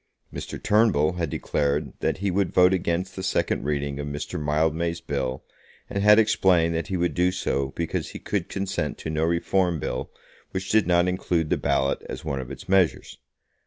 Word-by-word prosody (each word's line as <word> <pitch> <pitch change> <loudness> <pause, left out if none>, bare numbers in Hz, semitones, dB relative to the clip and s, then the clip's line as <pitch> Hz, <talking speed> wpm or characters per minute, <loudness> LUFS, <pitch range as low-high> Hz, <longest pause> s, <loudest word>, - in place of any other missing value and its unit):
Mr. - - -6
Turnbull 105 -9 +3
had 85 -3 -1
declared 70 0 -1
that - - 0
he 100 0 -1
would 95 0 +1
vote 90 +1 +5
against 90 +1 -1
the 95 - -5
second 95 -7 0
reading 70 -1 -2
of 75 - -4
Mr. 75 +1 -4
Mildmay's 80 +3 0
bill, 70 -5 -3 0.5
and 100 - -1
had 105 +1 +7
explained 95 -6 +3
that 80 0 -2
he 95 - -2
would 85 0 0
do 90 +1 +2
so 70 -6 -1
because 85 -1 -2
he - - -7
could - - -3
consent 95 -1 -2
to 80 - -5
no 80 0 0
Reform 85 +1 +1
Bill 65 - -3 0.4
which 95 0 -3
did 110 -4 +3
not 85 0 +3
include 85 -3 -1
the - - +4
ballot 70 +1 0
as - - -6
one 70 - -2
of 65 -1 -6
its - - -9
measures. 95 -3 +1
85 Hz, 190 wpm, -25 LUFS, 75-95 Hz, 0.5 s, had